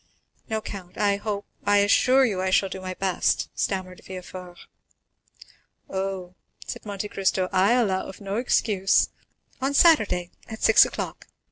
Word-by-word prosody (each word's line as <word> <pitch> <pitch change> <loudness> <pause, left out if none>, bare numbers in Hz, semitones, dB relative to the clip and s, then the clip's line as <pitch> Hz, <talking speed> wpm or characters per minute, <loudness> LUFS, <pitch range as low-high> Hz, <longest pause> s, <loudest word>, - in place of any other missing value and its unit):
"No, 220 -1 -1
count,—I 200 +1 -2
hope—I 205 0 -2
assure 255 +6 +4
you 200 -6 -1
I 190 - 0
shall 190 +1 +2
do 190 0 -7
my 185 0 -5
best," 190 -1 0
stammered 185 -2 -3
Villefort. 180 -1 -9 1.3
"Oh," 190 -2 -4 0.3
said - - -7
Monte 205 0 -4
Cristo, 190 -2 0
"I 195 +5 +4
allow 205 -7 +1
of 190 - -10
no 200 +1 -4
excuse. 210 -5 +2 0.5
On 275 +2 0
Saturday, 215 - +4 0.2
at 220 - -8
six 225 - +7
o'clock. - - -6
195 Hz, 135 wpm, -25 LUFS, 185-215 Hz, 1.3 s, six